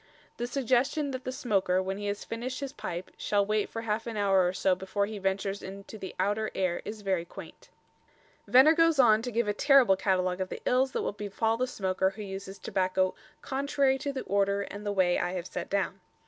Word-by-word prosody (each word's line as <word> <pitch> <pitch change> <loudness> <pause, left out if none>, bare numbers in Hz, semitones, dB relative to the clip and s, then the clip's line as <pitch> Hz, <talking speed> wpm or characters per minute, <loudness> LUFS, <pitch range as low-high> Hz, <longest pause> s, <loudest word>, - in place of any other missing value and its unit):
The 240 - -2
suggestion 275 +3 +1
that 260 -1 -6
the 255 - -2
smoker, 195 -7 +1
when 190 +1 -3
he 205 - -4
has 205 0 -3
finished 245 +3 -4
his 275 -1 -5
pipe, 180 - -6
shall 205 -1 +1
wait 215 0 0
for 225 - -5
half 225 +1 -2
an 225 -2 -4
hour 195 -3 +3
or - - +1
so 190 0 +2
before 190 +2 -1
he 210 0 -6
ventures 195 +1 -1
into 195 +3 -9
the 190 - -7
outer 205 +3 0
air 185 -2 0
is 210 0 -7
very 190 -3 0
quaint. 170 - -12 0.8
Venner 265 +5 +7
goes 330 -1 +4
on 220 -4 +6
to 245 - -4
give 235 -1 0
a 205 - +1
terrible 270 -4 +5
catalogue 185 -1 0
of 185 - -2
the - - -6
ills 260 +1 +2
that - - -1
will - - -1
befall 210 +2 -1
the 255 +2 -1
smoker 190 -5 0
who 195 +2 -8
uses 195 0 -7
tobacco 185 0 0 0.3
"contrary 275 0 +1
to 280 - -2
the 270 - -4
order 200 +1 +1
and 205 +1 -8
way 180 -2 +3
I 175 +1 -1
have 180 -2 -4
set 180 -1 -5
down." 195 -1 -1
205 Hz, 215 wpm, -29 LUFS, 190-245 Hz, 0.8 s, Venner